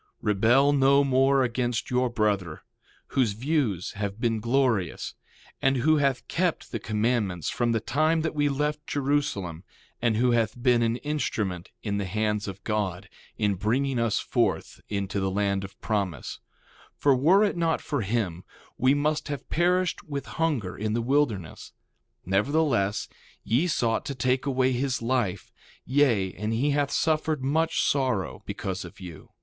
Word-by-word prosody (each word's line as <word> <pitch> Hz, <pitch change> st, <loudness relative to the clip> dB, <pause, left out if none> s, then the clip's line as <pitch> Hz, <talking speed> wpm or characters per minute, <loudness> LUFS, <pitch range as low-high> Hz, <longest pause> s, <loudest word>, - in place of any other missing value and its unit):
1:24 -, -, -39 dB, 0.2 s
Rebel 120 Hz, +8 st, +4 dB
no 140 Hz, 0 st, +5 dB
more 135 Hz, 0 st, +3 dB
against 120 Hz, -1 st, -1 dB
your 125 Hz, 0 st, +2 dB
brother, 105 Hz, -8 st, -1 dB, 0.5 s
whose 120 Hz, -6 st, +1 dB
views 120 Hz, -, -1 dB
have 100 Hz, 0 st, -4 dB
been 115 Hz, -2 st, 0 dB
glorious, 115 Hz, -6 st, 0 dB, 0.5 s
and 135 Hz, 0 st, +3 dB
who 155 Hz, +5 st, +3 dB
hath 140 Hz, -3 st, 0 dB
kept 180 Hz, -1 st, -1 dB
the 115 Hz, -, -3 dB
commandments 105 Hz, -5 st, -1 dB
from 120 Hz, -1 st, 0 dB
the 115 Hz, -, +1 dB
time 155 Hz, +7 st, +1 dB
that 160 Hz, 0 st, -2 dB
we 145 Hz, -1 st, +1 dB
left 150 Hz, +2 st, -2 dB
Jerusalem; 130 Hz, -, -1 dB, 0.4 s
and 115 Hz, -2 st, +2 dB
who 125 Hz, +2 st, +3 dB
hath 115 Hz, 0 st, +1 dB
been 120 Hz, -1 st, +3 dB
an 115 Hz, 0 st, +1 dB
instrument 110 Hz, -, -3 dB
in 100 Hz, -2 st, -1 dB
the 100 Hz, -, -2 dB
hands 105 Hz, +1 st, -1 dB
of 100 Hz, 0 st, -7 dB
God, 100 Hz, -3 st, -2 dB, 0.3 s
in 105 Hz, -2 st, +1 dB
bringing 120 Hz, +7 st, 0 dB
us 115 Hz, -3 st, +1 dB
forth -, -, -1 dB
into 100 Hz, -1 st, -2 dB
the 95 Hz, 0 st, 0 dB
land 100 Hz, 0 st, 0 dB
of 95 Hz, 0 st, -10 dB
promise; 100 Hz, -8 st, -2 dB, 0.6 s
for 140 Hz, -2 st, +4 dB
were 170 Hz, +11 st, +5 dB
it 205 Hz, -, +1 dB
not 165 Hz, -2 st, +1 dB
for 145 Hz, -4 st, -2 dB
him, 95 Hz, -5 st, -2 dB, 0.4 s
we 130 Hz, +2 st, +4 dB
must 150 Hz, +1 st, 0 dB
have 145 Hz, -4 st, -5 dB
perished 180 Hz, +1 st, +1 dB
with 140 Hz, -3 st, -5 dB
hunger 140 Hz, -, -1 dB
in 110 Hz, +1 st, -2 dB
the 115 Hz, -, 0 dB
wilderness; 115 Hz, -, -1 dB, 0.5 s
nevertheless, 105 Hz, -, +1 dB, 0.4 s
ye 130 Hz, +11 st, +1 dB
sought 115 Hz, -8 st, 0 dB
to 140 Hz, -, -4 dB
take 130 Hz, +2 st, 0 dB
away 130 Hz, -1 st, +2 dB
his 130 Hz, +1 st, -1 dB
life; 115 Hz, -6 st, -1 dB, 0.3 s
yea, 120 Hz, -9 st, +2 dB
and 105 Hz, +3 st, -3 dB
he 135 Hz, +6 st, +1 dB
hath 145 Hz, 0 st, +1 dB
suffered 155 Hz, -3 st, 0 dB
much 160 Hz, +4 st, +1 dB
sorrow 130 Hz, -9 st, 0 dB
because 95 Hz, 0 st, -4 dB
of 85 Hz, +2 st, -11 dB
you. 90 Hz, -4 st, -10 dB
120 Hz, 160 wpm, -26 LUFS, 100-140 Hz, 0.6 s, no